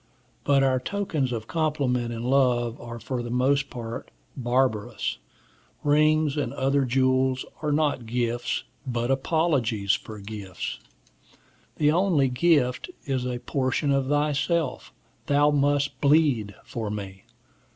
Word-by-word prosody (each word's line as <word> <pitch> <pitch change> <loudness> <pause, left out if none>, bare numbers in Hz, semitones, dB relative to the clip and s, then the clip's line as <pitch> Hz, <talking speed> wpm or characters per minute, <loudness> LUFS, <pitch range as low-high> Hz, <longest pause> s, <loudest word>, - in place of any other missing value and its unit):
But 140 -1 +3
our 130 -1 +3
tokens 155 -5 -2
of 115 -3 -3
compliment 140 -6 0
and 115 0 -4
love 125 -3 +2
are 120 0 -7
for 125 +1 -3
the 120 - -5
most 135 +3 +1
part 115 -1 -6 0.3
barbarous. 120 - 0 0.6
Rings 155 0 +3
and 135 -5 -1
other 135 0 +2
jewels 130 0 +2 0.2
are 150 -1 0
not 145 -5 0
gifts, 120 0 -1 0.2
but 120 0 -1
apologies 135 - +1
for 110 - -4
gifts. 100 -2 -6 1.0
The 150 0 +3
only 165 -6 +3
gift 125 - +2 0.2
is 130 -3 -1
a 125 -1 -2
portion 135 +1 0
of 135 -1 +1
thyself. 145 +1 0 0.4
Thou 145 +1 +4
must 145 -1 +1
bleed 140 -9 +3
for 110 -3 -4
me. 95 -2 -6
130 Hz, 125 wpm, -26 LUFS, 120-145 Hz, 1.0 s, Thou